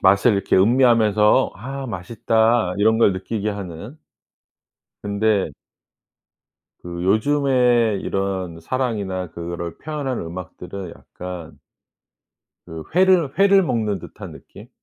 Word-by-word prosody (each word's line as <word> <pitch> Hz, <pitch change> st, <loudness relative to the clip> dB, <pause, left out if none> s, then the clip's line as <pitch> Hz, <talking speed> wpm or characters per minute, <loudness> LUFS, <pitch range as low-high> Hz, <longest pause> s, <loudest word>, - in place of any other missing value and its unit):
맛을 100 Hz, +5 st, +5 dB
이렇게 100 Hz, -1 st, +1 dB
음미하면서 110 Hz, -1 st, +4 dB
'아 135 Hz, +5 st, -6 dB
맛있다.' 110 Hz, 0 st, +1 dB
이런 110 Hz, +2 st, +3 dB
걸 105 Hz, -4 st, +4 dB
느끼게 105 Hz, +3 st, -3 dB
하는 100 Hz, -, -7 dB, 1.1 s
근데 100 Hz, -4 st, 0 dB, 1.3 s
그 85 Hz, 0 st, -6 dB
요즘에 120 Hz, -1 st, +2 dB
이런 95 Hz, -4 st, -3 dB
사랑이나 100 Hz, -5 st, -3 dB
그거를 85 Hz, 0 st, -6 dB
표현하는 145 Hz, -, -4 dB
음악들은 90 Hz, +1 st, -8 dB
약간 90 Hz, -3 st, -9 dB, 1.1 s
그 80 Hz, -1 st, -8 dB
회를 180 Hz, -6 st, +3 dB
회를 195 Hz, 0 st, +5 dB
먹는 110 Hz, -, -1 dB
듯한 -, -, -10 dB
느낌? -, -, -14 dB
105 Hz, 235 characters per minute, -21 LUFS, 90-125 Hz, 1.3 s, 맛을